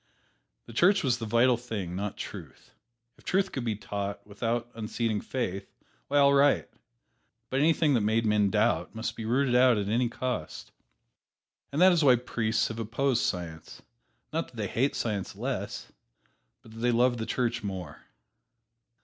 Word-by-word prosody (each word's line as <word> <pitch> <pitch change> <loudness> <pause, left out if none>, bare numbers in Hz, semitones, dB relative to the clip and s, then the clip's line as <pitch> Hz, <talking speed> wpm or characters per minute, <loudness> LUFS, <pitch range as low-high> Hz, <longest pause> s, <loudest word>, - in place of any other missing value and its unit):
The 115 - -12
Church 180 - +4
was 125 -3 +1
the 115 - -4
vital 120 +3 +4
thing 105 -8 -5
not 100 +1 -4
truth. - - -9 0.5
If - - -20
truth 195 +1 +1
could 130 - -4
be 115 -3 -1
taught 100 -1 -5
without 115 +3 -3
unseating 110 -1 -2
faith, 100 -7 -4 0.3
why, 145 - +1
all 140 0 +6
right, 140 +1 +4 0.8
but 130 - +1
anything 155 0 +3
that 120 - +3
made 110 +2 +1
men 105 -2 +3
doubt - - +1
must 110 +1 -3
be 110 - -6
rooted 125 +3 +1
out 125 -1 +5
at 100 -1 -2
any 120 +2 +1
cost. 125 +1 -4 1.0
And 140 - -2
that 185 - +8
is 170 -3 +2
why 130 -3 +7
priests 115 -1 -1
have 115 0 -6
opposed 120 +3 0
Science, 85 -4 -4 0.5
not - - -1
that - - -17
they - - -2
hate 135 +4 0
Science 105 -4 -3
less, - - -4 0.7
but 110 - -15
that 115 - -11
they 120 +1 +2
love 120 +1 +3
the 110 - -4
Church 120 -2 -1
more. 95 -7 -6
115 Hz, 165 wpm, -28 LUFS, 105-130 Hz, 1.0 s, that